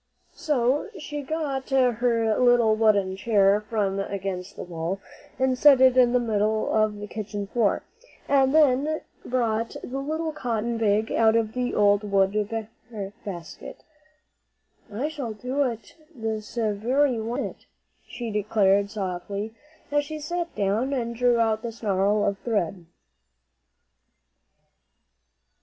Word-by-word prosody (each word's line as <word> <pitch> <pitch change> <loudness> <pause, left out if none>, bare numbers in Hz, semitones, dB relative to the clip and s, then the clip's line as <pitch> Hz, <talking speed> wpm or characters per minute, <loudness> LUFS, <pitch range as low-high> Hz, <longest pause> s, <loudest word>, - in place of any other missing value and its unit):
So 290 - 0
she 295 -2 -5
got 280 -2 -3
her 240 -4 +2
little 245 -3 +4
wooden 205 -4 +2
chair 200 0 +3
from 200 -3 0
against 195 -2 -4
the - - -6
wall, 175 +2 -4 0.4
and 260 0 +2
set 275 +1 +6
it 260 -1 +6
in 250 -2 +5
the 250 - +3
middle 215 -2 0
of 215 -1 +2
the 205 - -6
kitchen 210 -1 -5
floor, 210 +1 0 0.4
and 270 -1 +4
then 300 0 +3 0.2
brought 230 -2 -1
the 265 +2 -4
little 315 +3 -2
cotton 235 -5 -2
bag 215 0 +1
out 225 -1 +4
of 225 -1 +1
the 250 -1 -2
old 205 0 +4
work 195 -2 +2 0.9
basket. 175 -5 -8 1.1
"I 235 +8 -2
shall 280 -8 -5
do 250 +6 -3
it 230 -4 -5 0.2
all 235 - -14
this 220 0 -4
very 235 +4 +1
one 230 +2 -2
minute," - - -7 0.4
she 235 -2 -6
declared 200 -1 +2
softly, 200 +2 -4 0.4
as 290 0 +2
she 310 +2 -6
sat 345 +3 -4
down 215 +7 0
and 235 -3 -2
drew 245 0 +3
out 220 -1 +1
the 235 - -4
snarl 205 -2 +1
of 200 -1 -1
thread. 190 -6 -2
225 Hz, 135 wpm, -25 LUFS, 205-255 Hz, 1.1 s, set